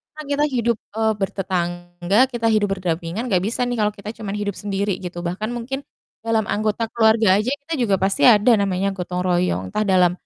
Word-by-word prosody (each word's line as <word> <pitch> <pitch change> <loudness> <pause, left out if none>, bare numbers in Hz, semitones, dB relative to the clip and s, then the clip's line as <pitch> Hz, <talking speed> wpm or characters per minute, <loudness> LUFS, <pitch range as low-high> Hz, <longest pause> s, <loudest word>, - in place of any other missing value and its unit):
kan 305 0 -8
kita 285 +1 +2
hidup, 235 -1 +1 0.2
eee, 220 0 +2
bertetangga, 175 -1 -2 0.2
kita 230 -1 -2
hidup 210 -1 +2
berdampingan 175 +3 -3
nggak 185 -6 +2
bisa 235 - -2
nih 245 - -1
kalau 210 0 +1
kita 205 +1 -7
cuma 205 -3 -5
hidup 205 -1 -2
sendiri 200 0 -1
gitu. 175 -1 -6
Bahkan 200 +6 -3
mungkin 255 +3 -4 0.5
dalam 225 -2 +1
anggota 215 +2 -1
keluarga 220 -1 +4
aja 225 - -2
kita 320 +4 -6
juga 200 -5 +3
pasti 195 0 +1
ada 220 +1 +5
namanya 195 -1 0
gotong 180 -1 -4
royong, 175 - +1
entah 215 - 0
dalam, 180 -2 +4
205 Hz, 185 wpm, -21 LUFS, 180-225 Hz, 0.5 s, ada